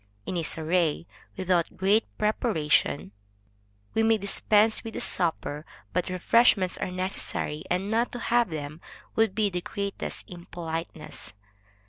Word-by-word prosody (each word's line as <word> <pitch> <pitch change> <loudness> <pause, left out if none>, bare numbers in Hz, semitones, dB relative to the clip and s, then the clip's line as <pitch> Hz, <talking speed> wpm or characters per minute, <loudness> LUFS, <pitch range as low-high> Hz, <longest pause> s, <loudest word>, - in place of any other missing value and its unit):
In - - -3
a 170 - 0
soirée 165 0 +1 0.3
without 180 -3 0
great 200 +4 +3
preparation, 180 - +1 0.8
we 225 - +2
may 225 0 +4
dispense 210 +2 +3
with 225 -2 -7
a - - -2
supper, 155 -3 0 0.3
but 180 0 0
refreshments 185 +1 +4
are - - -2
necessary; 180 -4 -3
and 190 +4 0
not 230 +2 +1
to - - -3
have 240 -2 +2
them 150 0 -6 0.3
would 225 -4 +2
be 210 -2 +1
the 180 0 -2
greatest 200 +2 -5
impoliteness. 165 -2 -7
185 Hz, 130 wpm, -27 LUFS, 165-215 Hz, 0.8 s, may